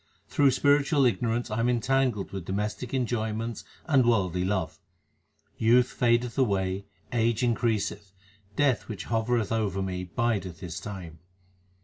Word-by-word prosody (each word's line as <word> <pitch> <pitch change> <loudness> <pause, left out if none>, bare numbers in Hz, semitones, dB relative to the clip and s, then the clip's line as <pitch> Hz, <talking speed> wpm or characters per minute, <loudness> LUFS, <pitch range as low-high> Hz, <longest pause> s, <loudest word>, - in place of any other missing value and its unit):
Through 140 -1 +4
spiritual 145 +1 +3
ignorance 115 +1 0
I 105 - -1
am 120 +2 +2
entangled 125 -3 +1
with 95 -3 -6
domes 105 +3 -1
tic 125 - -8
enjoyments 115 -3 -2 0.2
and 140 -6 +4
worldly 95 -7 +1
love. 95 -3 -2 0.8
Youth 120 +3 +4
fadeth 120 +1 +1
away, 100 -5 0 0.3
age 115 0 +1
increaseth, 110 -4 0 0.4
Death 140 -2 +2
which 105 -6 -5
hovereth 115 -1 +1
over 105 -4 0
me 90 -1 -3
bideth 95 -3 -2
his 85 -2 -5
time. 90 -6 -8
115 Hz, 130 wpm, -27 LUFS, 95-125 Hz, 0.8 s, Through